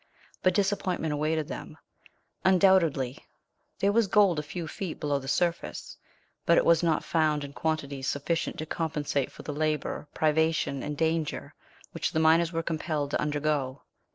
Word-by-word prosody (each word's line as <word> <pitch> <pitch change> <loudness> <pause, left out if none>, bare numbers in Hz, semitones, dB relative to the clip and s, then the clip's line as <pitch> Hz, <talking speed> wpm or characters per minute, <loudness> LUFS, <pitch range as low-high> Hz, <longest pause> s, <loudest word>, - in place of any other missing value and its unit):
But 185 -1 +3
disappointment 190 -5 0
awaited 155 +1 0
them. - - -7 0.7
Undoubtedly 170 -9 +3 0.6
there 200 - +2
was 225 0 +3
gold 195 -5 +4
a - - 0
few 160 +3 -6
feet 175 +1 -5
below 145 -1 0
the 135 - -9
surface, 170 +4 -1 0.5
but 170 - +4
it - - +4
was 170 -1 +5
not 165 -3 +1
found 155 -3 +1
in 140 0 -8
quantities 140 -4 -2
sufficient 150 +4 -1
to 155 - -4
compensate 150 -4 -2
for - - -12
the 150 - -4
labour, 155 0 -2
privation, 160 -3 +1
and 150 -1 -4
danger, 160 -1 -1 0.4
which - - -2
the 160 - +1
miners 165 +1 +4
were 165 -1 -2
compelled 155 -3 -2
to - - 0
undergo. 145 -2 -1
155 Hz, 155 wpm, -28 LUFS, 145-170 Hz, 0.7 s, was